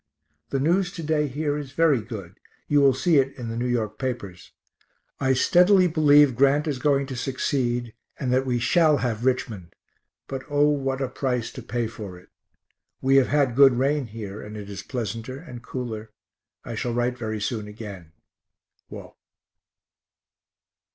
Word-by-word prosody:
The 135 - -1
news 175 +6 +2
to 170 -4 -6
day 150 -1 +1
here 145 +2 -2
is 140 -2 -8
very 150 -6 +3
good 105 -5 -9 0.3
you 145 -1 +3
will 135 -2 +5
see 155 +2 +3
it 135 +1 -1
[in 120 -3 -5
the] - - -4
N. 125 - 0
Y. 115 -2 +1
papers. 120 -9 -5 0.7
I 130 -1 +2
steadily 180 +8 +5
believe 150 -5 +5
Grant 140 +3 +3
is 145 -5 -2
going 140 0 +2
to 135 -1 -6
succeed, 120 -2 -1 0.3
and 125 -2 -1
that 130 +1 +3
we 125 -1 +1
shall 155 +5 +3
have 115 0 -2
Richmond 110 -9 -2 0.5
but 135 -1 -5
O 145 0 +3
what 135 -2 -1
a 135 - 0
price 125 -2 -2
to 130 - -8
pay 120 0 -2
for 105 -5 -8
it. 90 - -18 0.7
We 135 +1 +3
have 135 - +4
had 145 -3 +2
a - - -8
good 135 +1 +7
rain 135 +1 +1
here 105 -2 -7
and 105 +1 -8
it 100 -1 -8
is 95 - -6
pleasanter 115 +1 -5
and 130 -6 -10
cooler. 115 -4 -6 0.6
I - - -5
shall 120 -1 -2
write 120 +1 0
very 110 -3 -4
soon 105 0 -3
again. 100 -6 -9 0.8
WALT. - - -10
130 Hz, 170 wpm, -24 LUFS, 115-145 Hz, 0.8 s, good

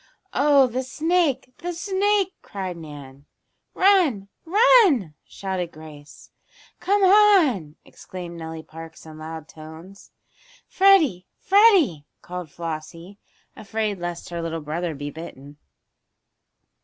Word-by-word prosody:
"Oh, 280 -2 +4
the 250 +1 -3
snake! 290 -2 -1
The 350 +1 -4
snake!" 390 +2 0
cried 190 -3 -6
Nan. 145 -4 -12 0.5
"Run! 335 - +3 0.2
Run!" 365 - +4
shouted 185 -3 -5
Grace. 150 -2 -14 0.5
"Come 400 +1 +1
on!" 365 - +4
exclaimed 175 -2 -10
Nellie 160 -1 -7
Parks, 160 0 -12
in 155 -1 -12
loud 160 0 -8
tones. 160 +5 -13 0.6
"Freddie! 340 - +3
Freddie!" 375 - +4 0.2
called 180 -2 -7
Flossie, 165 +4 -8 0.4
afraid 215 -1 -3
lest 175 0 -6
her 170 -1 -5
little 165 -1 -4
brother 160 +2 -4
be 145 +1 -6
bitten. 145 -2 -11
185 Hz, 105 wpm, -23 LUFS, -, 0.6 s, Oh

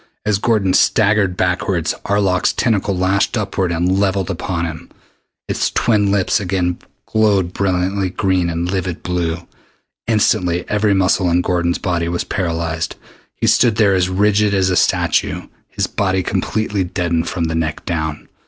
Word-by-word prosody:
As 105 -2 +1
Gordon 105 -5 +1
staggered 100 -3 +3
backward, 90 -2 0
Arlok's 100 -2 +1
tentacle 100 -5 0
lashed 95 +2 +1
upward 95 -2 -1
and 90 +3 +1
levelled 95 -1 0
upon 90 -1 -3
him. 80 -2 -7 0.6
Its - - 0
twin 105 -3 +1
tips 100 +1 +2
again 90 -3 -1 0.3
glowed 100 -5 +1
brilliant 95 0 -1
green 95 -3 +1
and 85 +1 -2
livid 95 -3 -3
blue. 85 -1 -2 0.6
Instantly 95 -6 +1
every 105 -1 +1
muscle 95 -1 +2
in 85 +1 +2
Gordon's 85 -1 0
body 85 -3 -1
was 85 0 -1
paralyzed. 85 -3 -2 0.4
He - - -2
stood 115 -3 +4
there 105 -3 +3
as 90 -1 +1
rigid 105 +2 +2
as 95 -1 +2
a - - +1
statue, - - +1 0.2
his - - -2
body 95 -2 -1
completely 105 +1 -1
deadened 85 -2 -1
from 85 - -3
the 80 0 -1
neck 80 -1 -2
down. 80 -3 -3
95 Hz, 150 wpm, -18 LUFS, 85-100 Hz, 0.6 s, stood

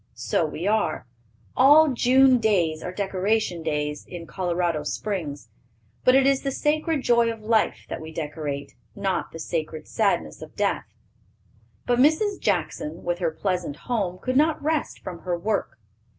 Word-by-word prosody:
So - - 0
we 160 +3 -5
are. 215 -7 0 0.5
All 295 +4 +7
June 255 +1 +5
days 175 -8 +1
are 180 - -5
decoration 195 -1 -1
days 150 -2 -2
in 175 -2 -8
Colorado 175 -3 -1
Springs, 150 - -4 0.5
but 255 - +5
it 270 0 +5
is 275 -1 +3
the 275 - -1
sacred 300 +1 0
joy 235 -1 +3
of 225 -1 -9
life 220 0 +1
that - - -5
we 160 0 -8
decorate, 150 -3 -5 0.2
not 195 -3 -2
the - - -8
sacred 155 -1 -4
sadness 215 -3 0
of - - -11
death." - - 0 1.0
But 245 0 +1
Mrs. 320 +9 +3
Jackson, 165 -4 -2
with 175 0 -1
her 170 -3 +1
pleasant 175 -2 -2
home, 195 -3 -2
could 255 +6 -1
not 310 +1 +3
rest 310 0 -1
from 180 -3 -6
her 175 -1 -2
work. 205 +3 -2
190 Hz, 155 wpm, -25 LUFS, 165-250 Hz, 1.0 s, All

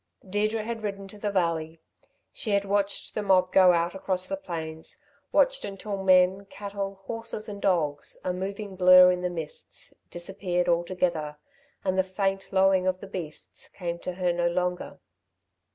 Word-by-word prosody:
Deirdre 215 +3 0
had 225 0 -4
ridden 200 -2 -4
to 205 +1 -13
the 205 - -1
valley. 165 -4 -1 0.5
She 220 - -5
had 200 -1 +2
watched 200 0 -1
the 215 - -1
mob 185 -2 +3
go 185 -1 +7
out 170 0 +1
across 185 -1 -1
the 290 - -2
plains, 160 - -7 0.3
watched - - +3
until 195 0 -5
men, 185 +1 +4
cattle, 200 -1 -6
horses 230 -1 -3
and 205 -1 -7
dogs, 155 -6 0
a 180 - 0
moving 195 +2 -5
blur 185 0 +8
in 180 0 -2
the 180 - 0
mists, 165 -3 -7 0.2
disappeared 180 0 -2
altogether, 170 -3 0 0.5
and 190 0 +1
the - - +5
faint 195 +1 -2
lowing 190 -1 +4
of 185 0 +1
the - - -8
beasts 170 -6 -6
came 170 -2 -5
to 180 - -4
her 180 -1 0
no 175 0 +1
longer. 180 +1 -2
185 Hz, 165 wpm, -27 LUFS, 175-200 Hz, 0.5 s, blur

